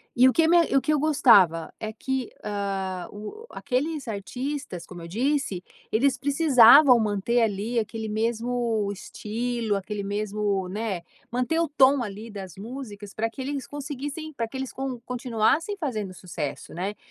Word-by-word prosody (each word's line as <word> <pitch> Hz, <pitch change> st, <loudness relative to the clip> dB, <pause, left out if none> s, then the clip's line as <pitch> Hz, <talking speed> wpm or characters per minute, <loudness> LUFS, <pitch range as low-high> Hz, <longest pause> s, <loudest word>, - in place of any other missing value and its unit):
e 250 Hz, +2 st, +7 dB
o 260 Hz, -, +4 dB
que 325 Hz, -1 st, +4 dB
me 340 Hz, 0 st, +5 dB
e -, -, 0 dB
o 275 Hz, -, +5 dB
que 305 Hz, -, 0 dB
eu 295 Hz, -, +2 dB
gostava 200 Hz, -, +4 dB
é 215 Hz, 0 st, -4 dB
que, 260 Hz, +2 st, -3 dB
hã, 195 Hz, -3 st, -3 dB
o 215 Hz, -, -8 dB
o -, -, -11 dB
aqueles 285 Hz, +2 st, -2 dB
artistas, 240 Hz, -, -4 dB
como 175 Hz, -2 st, -10 dB
eu 165 Hz, -, -8 dB
disse, 235 Hz, -, -1 dB, 0.3 s
eles 255 Hz, +4 st, +2 dB
precisavam 275 Hz, -2 st, +7 dB
manter 215 Hz, +3 st, +1 dB
ali 220 Hz, +2 st, 0 dB
aquele 220 Hz, 0 st, -4 dB
mesmo 230 Hz, 0 st, 0 dB
estilo, 225 Hz, +2 st, -3 dB
aquele 200 Hz, +1 st, -4 dB
mesmo, 205 Hz, -1 st, -1 dB
né, 205 Hz, -2 st, -3 dB, 0.3 s
manter 250 Hz, +7 st, 0 dB
o 335 Hz, -, +2 dB
tom 275 Hz, -2 st, +4 dB
ali 210 Hz, +1 st, -7 dB
das 190 Hz, -4 st, -8 dB
músicas 210 Hz, -2 st, -8 dB
pra 225 Hz, +1 st, -1 dB
que 245 Hz, -, -8 dB
eles 275 Hz, 0 st, -3 dB
conseguissem 290 Hz, +2 st, -6 dB
pra 235 Hz, -4 st, -2 dB
que 265 Hz, -, -7 dB
eles 265 Hz, -1 st, -4 dB
con 265 Hz, -2 st, -4 dB
continuassem 250 Hz, -, 0 dB
fazendo 215 Hz, -, -3 dB
sucesso, 170 Hz, -6 st, -6 dB
né. 190 Hz, +5 st, -3 dB
230 Hz, 165 wpm, -26 LUFS, 205-270 Hz, 0.3 s, e